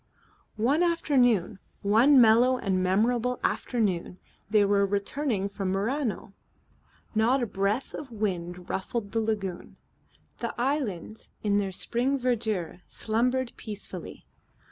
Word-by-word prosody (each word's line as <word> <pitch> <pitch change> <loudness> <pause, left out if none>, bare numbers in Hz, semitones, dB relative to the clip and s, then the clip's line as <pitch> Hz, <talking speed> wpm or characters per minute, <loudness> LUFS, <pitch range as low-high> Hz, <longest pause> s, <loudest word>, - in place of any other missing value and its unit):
One 255 +9 +2
afternoon, 250 - +2 0.2
one 235 +8 +6
mellow 240 +3 +6
and 190 -5 0
memorable 235 +6 +1
afternoon, 195 -7 -1 0.3
they 210 -1 +4
were 200 0 +3
returning 200 +2 -1
from 200 -1 -4
Murano. 215 0 -2 0.8
Not 240 +4 +3
a - - +2
breath 200 +4 -1
of 280 -4 -7
wind 180 -5 -3
ruffled 200 +2 -3
the 225 - 0
lagoon. 205 -5 -3 0.6
The - - -4
islands 240 - -2
in 205 -1 +2
their 195 -1 -2
spring 245 +8 0
verdure 220 -9 -1
slumbered 245 +3 0
peacefully. 210 -3 -8
220 Hz, 115 wpm, -27 LUFS, 195-250 Hz, 0.8 s, one